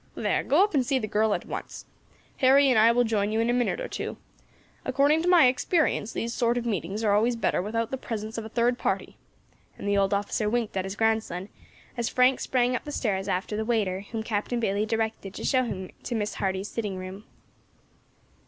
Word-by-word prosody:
There, - - 0
go 320 +7 +4
up 415 - 0
and 275 -3 +3
see 265 +2 +1
the 235 - -2
girl 215 0 +1
at - - -6
once, - - -7 0.5
Harry 270 +1 +5
and 235 - +4
I 225 +2 +6
will 245 +1 +3
join 215 -3 0
you 220 - 0
in 230 +1 +2
a - - +1
minute 245 - 0
or - - -4
two; - - -5 0.7
according 295 +3 +3
to 345 - -2
my 350 -6 +7
experience, 255 - +1
these 235 0 -3
sort 235 0 +1
of 240 - -2
meetings 200 0 -2
are 205 -2 +3
always 230 +4 +3
better 230 - 0
without 225 +3 -2
the 265 - -3
presence 220 -2 -5
of - - -6
a 220 - -8
third 240 +2 +1
party," - - -2 0.6
and - - -6
the 200 0 +2
old 195 0 +2
officer 205 +1 0
winked 230 -2 -1
at 190 -1 -1
his 195 +1 -5
grandson 220 -4 0 0.5
as 235 -1 -1
Frank 255 +1 +3
sprang 250 -1 +1
up - - -3
the 295 - -7
stairs 195 -8 -1
after 195 +2 -2
the 220 - -1
waiter 215 -5 0
whom 225 -1 -3
Captain 220 +2 -2
Bayley 210 -1 0
directed 220 -3 -2
to - - -6
show 255 -2 +2
him 190 -5 -5
to 240 - -4
Miss 210 -1 -2
Hardy's 190 0 -2
sitting 205 -4 -4
room. 185 +3 -8
225 Hz, 220 wpm, -26 LUFS, 205-245 Hz, 0.7 s, my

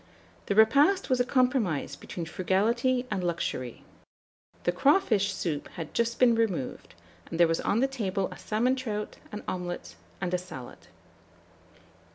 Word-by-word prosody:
The 200 - 0
repast 280 - +5
was 255 - +3
a - - +5
compromise 250 - +1
between 170 - -6
frugality 230 +9 +1
and 185 - -1
luxury. 165 -8 -3 0.8
The 175 - +2
crawfish 215 - +3
soup 150 -5 -3
had 165 -3 -6
just 235 0 0
been 250 -2 +6
removed, 205 - -2 0.3
and 165 - -5
there 170 - +7
was 165 0 0
on 220 - +1
the 270 - +4
table 200 -8 -2
a - - -9
salmon 240 +5 +1
trout, 215 -5 -4
an 210 - -6
omelet, 175 -1 -4 0.2
and 180 -1 -2
a 180 - +2
salad. 135 -9 -10
210 Hz, 150 wpm, -28 LUFS, 175-250 Hz, 0.8 s, there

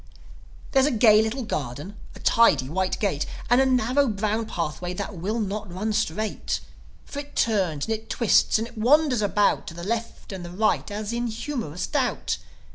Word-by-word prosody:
There's 270 0 +4
a 260 -6 0
gay 215 -1 +7
little 225 +4 -2
garden, 150 - -4 0.2
a - - -11
tidy 150 - +4
white 185 +5 -1
gate, 185 -9 0 0.2
And 245 +2 +6
a 265 - +3
narrow 255 +2 +2
brown 215 +1 -1
pathway 175 +1 -3
that 200 +2 -4
will 205 +7 -2
not 205 -2 -3
run 210 +5 -2
straight; 215 0 -1 0.5
For 285 - -6
it 290 0 -9
turns 185 -10 +1
and 225 - -1
it 220 0 -6
twists 230 -2 +3
and 225 +1 -2
it 235 -1 -11
wanders 265 0 +4
about 205 0 +2
To 170 - -7
the 170 - -7
left 230 +3 -4
and 185 -2 -6
the 175 - -7
right, 215 +5 0
as 210 +2 -4
in 240 0 -1
humorous 230 - -4
doubt. 265 -4 -1
215 Hz, 185 wpm, -25 LUFS, 190-235 Hz, 0.5 s, gay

